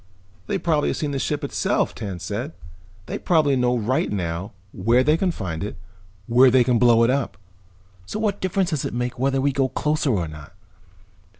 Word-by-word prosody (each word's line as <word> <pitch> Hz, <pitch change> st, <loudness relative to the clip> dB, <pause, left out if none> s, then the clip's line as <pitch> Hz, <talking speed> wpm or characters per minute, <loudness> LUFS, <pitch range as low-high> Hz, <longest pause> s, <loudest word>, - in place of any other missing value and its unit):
"They -, -, 0 dB
probably 155 Hz, -3 st, +1 dB
have -, -, -2 dB
seen 150 Hz, -2 st, -2 dB
the 135 Hz, -, -2 dB
ship -, -, -2 dB
itself," -, -, 0 dB
Tance 95 Hz, -6 st, -6 dB
said. 115 Hz, -, -4 dB, 0.5 s
"They -, -, -5 dB
probably 155 Hz, -5 st, +3 dB
know 125 Hz, -1 st, +2 dB
right 120 Hz, +4 st, 0 dB
now 90 Hz, +1 st, -3 dB, 0.2 s
where 115 Hz, +7 st, +2 dB
they 150 Hz, +3 st, +4 dB
can 185 Hz, +3 st, +1 dB
find 90 Hz, -, -4 dB
it, 105 Hz, -, -5 dB, 0.5 s
where 125 Hz, +4 st, +6 dB
they 125 Hz, 0 st, +5 dB
can 120 Hz, -2 st, +2 dB
blow 120 Hz, -2 st, +5 dB
it 115 Hz, -, +3 dB
up. 135 Hz, -2 st, -2 dB, 0.7 s
So -, -, -4 dB
what 210 Hz, -2 st, -1 dB
difference 185 Hz, -1 st, 0 dB
does 150 Hz, -4 st, -1 dB
it -, -, -4 dB
make 125 Hz, 0 st, -3 dB
whether 135 Hz, +1 st, +1 dB
we 140 Hz, +1 st, +2 dB
go 135 Hz, -1 st, 0 dB
closer 150 Hz, +1 st, 0 dB
or 95 Hz, -9 st, 0 dB
not?" 75 Hz, -2 st, -11 dB
125 Hz, 195 wpm, -23 LUFS, 105-145 Hz, 0.7 s, where